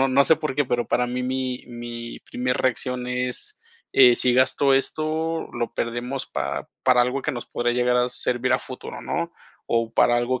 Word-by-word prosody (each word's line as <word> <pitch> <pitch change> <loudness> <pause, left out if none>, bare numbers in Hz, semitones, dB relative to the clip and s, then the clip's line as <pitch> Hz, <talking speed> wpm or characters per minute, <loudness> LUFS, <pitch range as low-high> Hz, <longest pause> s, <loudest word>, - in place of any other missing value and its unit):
no 135 - +4
no 135 +2 +5
sé 160 - +5
por 150 -4 -3
qué, 145 0 +2
pero 120 -1 -1
para 125 0 +1
mí 125 +1 -2
mi 130 -1 -2
mi 120 -1 -7
primer 125 0 -2
reacción 125 0 -1
es, 125 0 -2 0.4
eh, 125 -3 +7
sí 125 - +3
gasto 130 +2 +3
esto, 155 +4 -1
lo 120 -1 -3
perdemos 120 +3 -3
para - - -3 0.2
para 125 -1 +5
algo 125 +3 -1
que - - -1
nos 120 - -6
podría 120 0 -1
llegar 125 0 +2
a 125 0 +2
servir 125 +1 0
a 125 - +4
futuro, 130 - -8
¿no? 170 0 -2 0.3
O 115 -1 0
para 120 0 +4
algo 125 +1 0
125 Hz, 195 wpm, -24 LUFS, 120-130 Hz, 0.4 s, eh